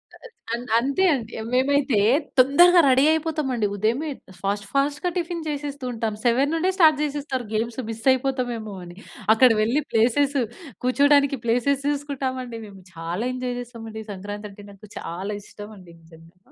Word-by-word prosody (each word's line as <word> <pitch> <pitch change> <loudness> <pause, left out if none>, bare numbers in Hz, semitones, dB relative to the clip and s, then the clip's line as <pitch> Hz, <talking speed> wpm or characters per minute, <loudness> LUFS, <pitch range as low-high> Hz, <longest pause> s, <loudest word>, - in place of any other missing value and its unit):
ఆహ్, - - -14 0.2
అంత్ 240 0 -5
అంతే 275 +9 0
అండి. 235 -5 -4 0.2
మేమైతే 265 -3 +2 0.4
తొందరగా 345 +7 +6
రెడీ 265 +2 +5
అయిపోతాం 315 -2 -1
అండి. 215 -3 +1
ఉదయమే 235 +10 0 0.3
ఫాస్ట్ 200 0 -2
ఫాస్ట్‌గా 290 +5 0
టిఫిన్ 340 -1 -3
చేసేస్తూ 285 -2 -5
ఉంటాం. 225 -2 -2
7 260 +5 +3
నుండే 355 +3 +1
స్టార్ట్ 315 -5 +6
చేసేస్తారు 280 -4 -3
గేమ్స్. 230 +3 -2
మిస్ 225 0 -6
అయిపోతామేమో 245 -5 -3
అని 175 +2 -12 0.4
అక్కడ 255 +2 +6
వెళ్ళి 245 +8 +1
ప్లేసెస్ 270 +5 +2 0.5
కూర్చోడానికి 280 +1 +4
ప్లేసెస్ 260 +4 +1
చూసుకుంటాం 280 -2 -3
అండి. 230 -2 -8
మేము 195 -2 -14
చాలా 170 +6 -4
ఎంజాయ్ 250 -1 -3
చేస్తాం 235 -2 -10
అండి. 220 0 -7
సంక్రాంతి 205 +2 -7
అంటే 205 +1 -13
నాకు 200 +1 -15
చాలా 190 +5 -5
ఇష్టం 205 +1 -11
అండి 180 -3 -15
నిజంగా. 165 +3 -20
250 Hz, 155 wpm, -23 LUFS, 215-285 Hz, 0.5 s, తొందరగా